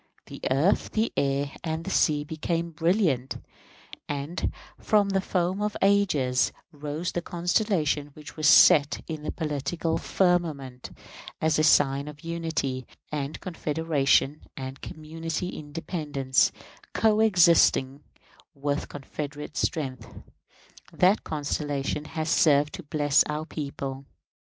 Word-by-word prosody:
The - - -10
earth, 145 +9 +2
the 220 +1 0
air, 140 0 0
and 160 0 -3
the 195 - -4
sea 150 -5 +2
became 165 +2 -3
brilliant; 165 - +1 0.7
and 145 +4 -3 0.3
from 205 -2 +2
the 195 -1 +1
foam 185 +1 -1
of 210 0 -1
ages 165 -11 +2 0.2
rose 150 +4 -4
the 175 - -2
constellation 175 -4 0
which 150 -1 -11
was 155 -1 +1
set 150 -3 +6
in 155 -2 -5
the 150 - -4
political 160 +2 -2
firmament, 155 -11 0 0.5
as 160 -1 +2
a - - +3
sign 140 -2 +4
of 150 -1 -10
unity 160 -7 -3 0.2
and 145 -1 -3
confederation 150 -4 +1 0.2
and 130 0 -7
community 165 +3 -5
independence, 145 -4 -1 0.4
coexistent 175 -10 +4 0.5
with 145 +1 -2
confederate 145 +1 -7
strength. 130 -7 -2 0.8
That 185 +4 +3
constellation 145 -1 -2
has 155 0 -4
served 150 -3 +3
to - - -6
bless 145 -2 +2
our 150 +1 -3
people. 140 -3 -6
155 Hz, 115 wpm, -26 LUFS, 140-170 Hz, 0.8 s, set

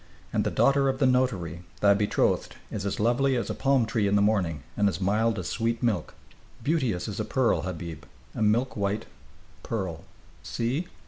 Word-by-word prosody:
And - - +2
the - - 0
daughter 135 0 +3
of 135 - -1
the 135 - +2
notary, 105 -11 +1 0.2
thy 100 -1 +6
betrothed, 105 +1 +1 0.2
is 100 -2 -3
as 100 - -3
lovely 125 +5 +2
as 120 -2 -1
a - - -1
palm 130 +3 +2
tree 110 -2 0
in 100 - +2
the 100 - +4
morning 90 -9 +1
and 105 0 +3
as 95 - -4
mild 110 +4 +1
as 90 -4 -3
sweet 115 +1 -1
milk, 105 -9 0 0.5
beauteous 130 - 0
as - - -5
a - - +1
pearl, - - +1
Habib, 85 -4 -6 0.3
a - - -5
milk 115 +5 +2
white 100 0 -1 0.6
pearl. 95 -7 -4 0.4
See!" 130 +9 -2
110 Hz, 185 wpm, -27 LUFS, 95-125 Hz, 0.6 s, thy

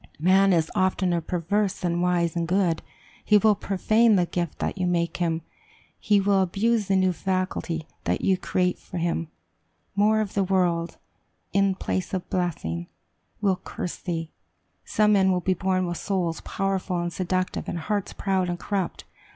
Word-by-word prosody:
Man 190 +4 +4
is 165 -3 +2
oftener 185 -2 +1
perverse 185 +5 0
than 175 -1 -1
wise 175 -2 +1
and 170 -1 -1
good; 180 -2 +1 0.4
he 210 - +5
will 215 +1 +5
profane 215 +3 +3
the 180 -2 +3
gift 170 -2 -3
that - - -2
you 180 - +1
make 170 -1 0
him; 165 -2 -1 0.6
he 205 -1 +3
will 195 0 +3
abuse 205 +4 +1
the 195 - +2
new 185 -1 +3
faculty 185 -3 -2 0.2
that - - 0
you 190 - +3
create 180 0 0
for 180 - -8
him. 170 -1 -1 0.7
More 215 +2 +4
of 210 -2 -2
the 200 - +2
world, 175 -3 0 0.6
in 195 -1 +3
place 185 0 -2
of 185 - -4
blessing, 85 - -2 0.5
will 195 -3 +1
curse 180 - -5
thee. 165 -2 -4 0.5
Some 210 -1 +3
men 190 -1 +4
will 180 - +2
be 185 +1 +1
born 185 0 0
with 175 -1 -3
souls 180 -5 -1
powerful 195 -2 -2
and 175 0 -3
seductive, 185 0 -2
and - - -3
hearts 205 +4 -2
proud 190 -2 0
and 175 - -2
corrupt. 190 -2 -3
185 Hz, 165 wpm, -25 LUFS, 175-195 Hz, 0.7 s, he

